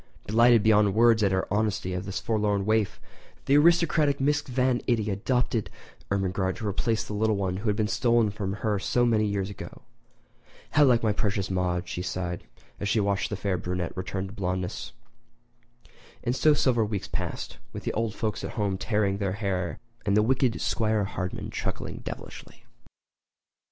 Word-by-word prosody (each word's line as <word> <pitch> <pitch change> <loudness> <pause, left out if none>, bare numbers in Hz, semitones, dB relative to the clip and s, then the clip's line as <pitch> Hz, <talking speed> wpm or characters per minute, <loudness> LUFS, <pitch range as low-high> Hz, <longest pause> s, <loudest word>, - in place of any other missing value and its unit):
Delighted 115 +1 +5
beyond 105 -2 +4
words 115 -1 +5
at 100 - +4
the 95 0 0
honesty 105 -3 0
of 90 +1 -3
this 95 0 -3
forlorn 105 -3 0
waif, 110 -1 +1 0.5
the 140 - +4
aristocratic 155 -2 +4
Mrs. 145 +2 +1
Van 125 -1 +1
Itty 110 -4 +1
adopted 115 +2 0 0.4
Ermengarde 95 -1 0
to 110 - -4
replace 110 +3 0
the - - -7
little 110 +1 +1
one 95 -2 -1
who 105 +3 -2
had 105 - +1
been 105 -1 0
stolen 115 -1 +2
from 100 -2 -3
her 105 -2 +1
so 120 +5 +1
many 110 -2 +2
years 100 -1 -2
ago. - - -10 0.9
"How 150 -1 +5
like 120 -3 +4
my 110 -2 +2
precious 100 -2 -1
Maude," 90 -1 -1
she 90 - -4
sighed, 90 -1 -3 0.4
as 100 - -2
she 110 - +2
watched 100 -1 0
the 105 - -2
fair 95 -2 -1
brunette 90 -1 -3
return 95 +1 -3
to 95 - -9
blondeness. 90 -2 -3 1.3
And 120 - 0
so 150 +2 +4
several 120 -6 +2
weeks 100 -3 -3
passed, - - -5
with - - -7
the - - -2
old 115 -1 -1
folks 110 -2 -2
at - - -5
home 100 -3 -1
tearing 100 -3 0
their 100 -2 -1
hair 95 -4 -2 0.3
and 100 0 +2
the 105 - +5
wicked 130 0 +1
'Squire 110 -2 +1
Hardman 95 -2 -4
chuckling - - -4
devilishly. - - -9
105 Hz, 175 wpm, -27 LUFS, 95-115 Hz, 1.3 s, Delighted